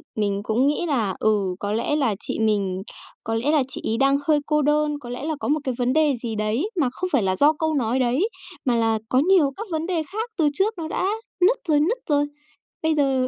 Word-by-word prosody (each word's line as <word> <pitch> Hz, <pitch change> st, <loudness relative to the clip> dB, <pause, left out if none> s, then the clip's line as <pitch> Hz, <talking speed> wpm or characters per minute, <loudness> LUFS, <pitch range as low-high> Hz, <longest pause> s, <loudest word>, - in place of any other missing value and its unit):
mình 205 Hz, -2 st, -1 dB
cũng 230 Hz, +6 st, +2 dB
nghĩ 295 Hz, +4 st, 0 dB
là, 225 Hz, -, 0 dB
ừ, 205 Hz, -4 st, +1 dB
có 205 Hz, -, -3 dB
lẽ 230 Hz, +7 st, 0 dB
là 260 Hz, -9 st, +1 dB
chị -, -, -4 dB
mình 200 Hz, -4 st, 0 dB, 0.4 s
có 225 Hz, -, -2 dB
lẽ 240 Hz, +6 st, +1 dB
là 305 Hz, -3 st, +3 dB
chị 270 Hz, -, -7 dB
ấy 225 Hz, -, -1 dB
đang 275 Hz, +2 st, +3 dB
hơi 305 Hz, -2 st, +4 dB
cô 300 Hz, 0 st, +2 dB
đơn, 295 Hz, 0 st, +1 dB
có 245 Hz, -, -10 dB
lẽ 245 Hz, +2 st, -5 dB
là 315 Hz, +1 st, -1 dB
có -, -, -3 dB
một 300 Hz, +2 st, +2 dB
cái 260 Hz, -, -1 dB
vấn 250 Hz, 0 st, +1 dB
đề 310 Hz, -1 st, +3 dB
gì 225 Hz, -2 st, -3 dB
đấy 215 Hz, -, -1 dB
mà 265 Hz, -, +2 dB
không 365 Hz, +8 st, -4 dB
phải 225 Hz, -, +3 dB
là 185 Hz, -1 st, +1 dB
do 290 Hz, +8 st, +4 dB
câu 315 Hz, +1 st, -1 dB
nói 255 Hz, -2 st, 0 dB
đấy 260 Hz, -, +1 dB, 0.4 s
mà 245 Hz, -2 st, +2 dB
là 225 Hz, -1 st, +2 dB
có 255 Hz, -, +3 dB
nhiều 325 Hz, -2 st, +4 dB
các 435 Hz, -, -6 dB
vấn 320 Hz, 0 st, -1 dB
đề 340 Hz, -4 st, 0 dB
khác 445 Hz, +4 st, -3 dB
từ 305 Hz, -3 st, +3 dB
trước 395 Hz, +8 st, +1 dB
nó 320 Hz, -2 st, -4 dB
đã 360 Hz, -, -1 dB, 0.4 s
nứt 420 Hz, +8 st, +5 dB
rồi 300 Hz, -2 st, +4 dB
nứt 370 Hz, +12 st, +1 dB
rồi. 290 Hz, -1 st, +3 dB, 0.6 s
Bây 320 Hz, 0 st, +2 dB
giờ 270 Hz, -3 st, +2 dB
275 Hz, 250 wpm, -23 LUFS, 225-310 Hz, 0.6 s, nứt